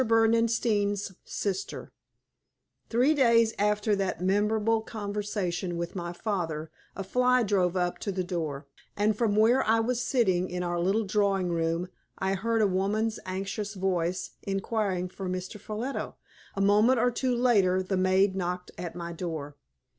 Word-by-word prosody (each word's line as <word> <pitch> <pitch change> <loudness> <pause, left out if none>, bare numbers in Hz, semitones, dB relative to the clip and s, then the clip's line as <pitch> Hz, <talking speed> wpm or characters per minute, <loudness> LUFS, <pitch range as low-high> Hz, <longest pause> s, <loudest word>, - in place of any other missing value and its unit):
BERDENSTEIN'S 225 -3 +2
SISTER 195 -1 -4 1.0
Three 250 +6 +3
days 230 -5 +4
after 210 +1 +2
that 195 -2 -2
memorable 210 +4 +2
conversation 205 -5 -3
with 170 +2 -4
my 175 -2 -4
father 170 -5 -3 0.2
a 195 - -4
fly 250 +5 +3
drove 190 -4 +1
up 180 -1 -1
to 200 - -3
the 185 -1 -2
door, 160 -6 -3 0.3
and 210 +1 +2
from 210 -2 +1
where 230 +5 +4
I 225 +1 +3
was 240 +2 0
sitting 190 -9 +1
in 180 0 -3
our 175 0 -1
little 195 +6 +1
drawing 195 -2 +1
room 165 +1 0 0.3
I 190 0 0
heard 225 +3 +1
a - - +4
woman's 210 +4 0
anxious 195 +3 -4
voice 185 -2 -1
inquiring 195 -2 -1
for 185 0 -6
Mr. 185 +3 -5
Ffolliot. 220 +7 -4 0.4
A 195 - -1
moment 210 +6 +4
or 245 +2 +3
two 250 +1 0
later 200 -7 +3
the 190 +1 -2
maid 190 +1 +3
knocked 180 -1 -3
at 175 -2 -5
my 170 -1 -5
door. 160 -4 -5
200 Hz, 150 wpm, -28 LUFS, 180-220 Hz, 1.0 s, days